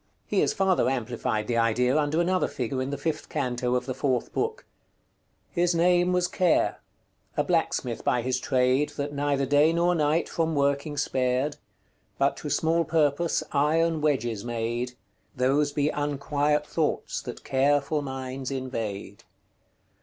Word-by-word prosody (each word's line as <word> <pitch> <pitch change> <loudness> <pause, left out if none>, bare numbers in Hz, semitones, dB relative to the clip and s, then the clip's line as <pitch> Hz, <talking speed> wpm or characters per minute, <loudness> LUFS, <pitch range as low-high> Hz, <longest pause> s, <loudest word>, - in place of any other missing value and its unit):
He - - 0
has - - +3
farther 190 -8 +2
amplified 120 -4 -2
the 115 +1 -1
idea 120 +3 +2
under 155 +1 +1
another 185 +2 +2
figure 130 +1 -3
in 130 - -2
the 140 - -3
fifth 155 +2 -3
canto 125 -3 -1
of 125 0 -1
the 130 - -3
fourth 130 -2 -1
book: 445 +1 -2 0.9
"His 175 0 +1
name 175 +1 +3
was 180 0 +2
Care; 180 -3 +1 0.6
a - - +3
blacksmith - - -1
by 120 -1 +1
his 130 0 0
trade, 130 +3 +2
That 145 0 -3
neither 140 -1 0
day 145 +4 +4
nor 170 +1 +2
night 155 0 +1
from 165 -1 -1
working 140 +1 0
spared; 130 +1 0 0.6
But - - +2
to - - -5
small 165 +1 +2
purpose 160 0 +1
yron 160 +2 +2
wedges 120 -8 0
made: 120 +1 -3 0.4
Those 140 +3 +2
be 145 0 +1
unquiet 145 +1 0
thoughts 155 0 -1
that - - -8
carefull 145 +2 +1
minds 130 -1 -5
invade. 115 -7 -5
140 Hz, 145 wpm, -26 LUFS, 125-155 Hz, 0.9 s, day